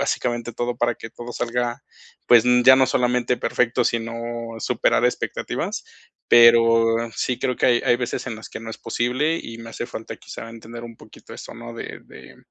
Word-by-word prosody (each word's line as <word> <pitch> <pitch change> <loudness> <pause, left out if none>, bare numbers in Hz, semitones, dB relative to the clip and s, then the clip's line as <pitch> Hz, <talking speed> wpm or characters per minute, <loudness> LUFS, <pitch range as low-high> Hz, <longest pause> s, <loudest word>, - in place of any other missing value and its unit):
básicamente 120 -3 -1
todo 120 +1 -3
para 120 -1 +1
que 115 - -9
todo 120 0 -9
salga, 120 0 -2 0.4
pues, 120 -1 +6 0.2
ya 130 0 +9
no 130 -1 +4
solamente 125 0 +1
perfecto, 125 -1 0
sino 115 0 -1 0.4
superar 120 +1 +1
expectativas. 125 - -2 0.4
Pero 115 -1 +6 0.3
sí, 125 - -1
creo 125 -2 -1
que - - +2
hay 120 -1 +3
hay 120 - +4
veces 120 +1 -4
en 115 -3 -4
las 110 - -10
que - - -7
no 115 0 -7
es - - -7
posible 135 +7 0
y 115 - -8
me 115 0 -9
hace 120 - -5
falta 115 -2 -7
quizá 115 - -9
entender 115 +1 -10
un 115 -1 -10
poquito - - -15
eso, - - -10
¿no? 120 0 -9
De - - -7
de 65 0 -14
120 Hz, 185 wpm, -22 LUFS, 115-125 Hz, 0.4 s, ya